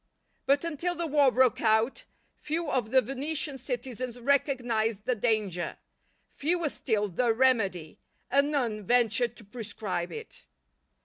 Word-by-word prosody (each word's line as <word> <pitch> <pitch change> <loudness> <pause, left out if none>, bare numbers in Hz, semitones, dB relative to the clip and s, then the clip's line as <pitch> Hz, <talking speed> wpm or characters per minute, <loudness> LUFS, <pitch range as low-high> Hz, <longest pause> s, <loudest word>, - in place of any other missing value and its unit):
But 280 +2 +3
until 335 +2 -2
the 340 - -2
war 290 -3 +4
broke 255 -1 +3
out, 220 +2 +2 0.3
few 310 0 -3
of 245 -4 0
the 260 +1 +4
Venetian 280 +3 -3
citizens 250 -1 -5
recognized 240 -5 +1
the 250 - +2
danger, 210 -6 -1 0.6
fewer 330 +1 0
still 215 -6 -1
the 230 +6 +1
remedy, 200 -11 +1 0.3
and 280 +2 +4
none 235 -8 -1
ventured 235 +1 +2
to - - -13
prescribe 205 -5 -4
it. 450 0 -10
245 Hz, 130 wpm, -28 LUFS, 220-280 Hz, 0.6 s, war